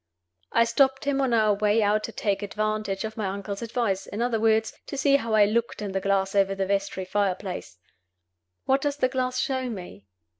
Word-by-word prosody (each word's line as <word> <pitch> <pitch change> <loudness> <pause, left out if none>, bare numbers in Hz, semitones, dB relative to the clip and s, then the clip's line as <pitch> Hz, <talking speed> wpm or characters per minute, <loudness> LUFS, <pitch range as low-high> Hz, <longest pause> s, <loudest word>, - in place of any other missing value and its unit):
I 230 - +4
stopped 265 +4 +2
him 280 -1 +1
on 265 -2 +1
our 215 -2 +4
way 210 +2 +2
out 210 +1 +2
to - - -7
take 200 -2 -1
advantage 215 -1 -2
of 220 0 -5
my 210 -3 -1
uncle's 200 +1 -5
advice; 230 -4 -1
in 205 - -6
other 235 -1 +1
words, 220 0 +2
to 280 - -5
see 280 0 +4
how 225 -4 -1
I 210 -1 +6
looked 230 +3 -1
in 205 -2 -4
the 190 0 -1
glass 195 0 +1
over 195 -1 +2
the 195 0 -1
vestry 195 -1 -1
fireplace. 190 - -2 0.9
What 270 +1 +2
does 290 0 -1
the 255 -3 +2
glass 255 -1 -1
show 260 -1 -1
me? 175 - -8
215 Hz, 200 wpm, -26 LUFS, 195-240 Hz, 0.9 s, I